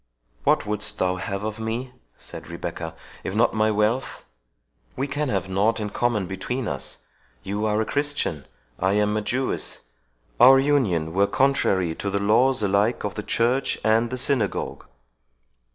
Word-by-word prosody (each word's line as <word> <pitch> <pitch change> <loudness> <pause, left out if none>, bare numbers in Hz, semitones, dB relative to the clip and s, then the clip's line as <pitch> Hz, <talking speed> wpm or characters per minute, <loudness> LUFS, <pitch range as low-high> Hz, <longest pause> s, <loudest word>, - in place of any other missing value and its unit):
"What - - +3
wouldst 105 0 0
thou 90 0 0
have 100 +1 -4
of 110 +1 -4
me," 115 +3 -3 0.3
said - - -9
Rebecca, - - -6 0.3
"if 95 - -4
not 115 +2 +3
my 110 0 +2
wealth?—We 105 - -4
can 145 +1 -2
have 95 -4 -1
nought 100 +5 +1
in 105 -1 -3
common 120 -5 0
between 110 +7 -3
us—you 75 - -5
are 105 0 +1
a 110 - +1
Christian—I 95 - -2
am 105 0 +2
a 105 - 0
Jewess.—Our 105 - +1
union 115 - +1
were 100 +2 +3
contrary 95 -11 +2
to 100 - -4
the 100 - 0
laws, 110 +4 +3
alike 100 +4 +1
of 100 - -2
the 105 - -4
church 120 +5 +1
and 115 +2 +3
the 130 - -3
synagogue." 125 -5 -1
105 Hz, 145 wpm, -24 LUFS, 95-125 Hz, 0.3 s, What